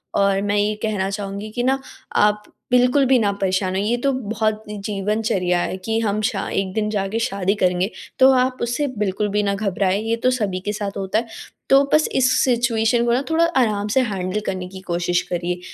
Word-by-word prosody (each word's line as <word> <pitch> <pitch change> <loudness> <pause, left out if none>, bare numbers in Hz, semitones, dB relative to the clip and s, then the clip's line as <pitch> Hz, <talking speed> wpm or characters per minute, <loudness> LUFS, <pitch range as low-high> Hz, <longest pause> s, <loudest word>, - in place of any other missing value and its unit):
और 195 -1 +2
मैं 205 0 0
ये 205 +1 +2
कहना 200 -3 -1
चाहूँगी 200 +1 -5
कि 245 +2 -2
ना, 265 +2 +1 0.3
आप 210 0 +3 0.3
बिल्कुल 250 +3 +4
भी 260 0 +4
ना 205 -3 +2
परेशान 185 0 0
होइए, 195 +2 0
ये - - +3
तो 275 - +3
बहुत 220 -3 -2
जीवनचर्या 205 -2 -1
है 185 - -3
कि 225 0 0
हम 210 -1 0
श 245 - 0 0.2
एक 195 -1 -1
दिन 215 -1 -1
जा 200 -2 -1
के 220 +4 -2
शादी 195 -3 0
करेंगे। 180 -1 +1 0.3
तो 260 0 +8
आप 255 0 +1
उससे 245 +5 0
बिल्कुल 210 +1 0
भी 210 +1 +1
ना 200 -1 0
घबराएँ, 195 -1 0
ये 225 +1 0
तो 255 - +5
सभी 205 -7 -1
के 210 - -1
साथ 205 -1 -3
होता 195 +2 0
है। 230 - -6 0.4
तो 275 +1 +6
बस 305 0 +4
इस 255 -1 +3
सिचुएशन 235 -1 +2
को 235 - +2
ना 260 +3 +1
थोड़ा 330 +1 +4
आराम 210 -5 +1
से 265 - +5
हैंडल 195 -4 -2
करने 185 -1 -3
की 190 0 -10
कोशिश 175 +1 0
करिए। 175 0 -2
210 Hz, 210 wpm, -21 LUFS, 195-235 Hz, 0.4 s, तो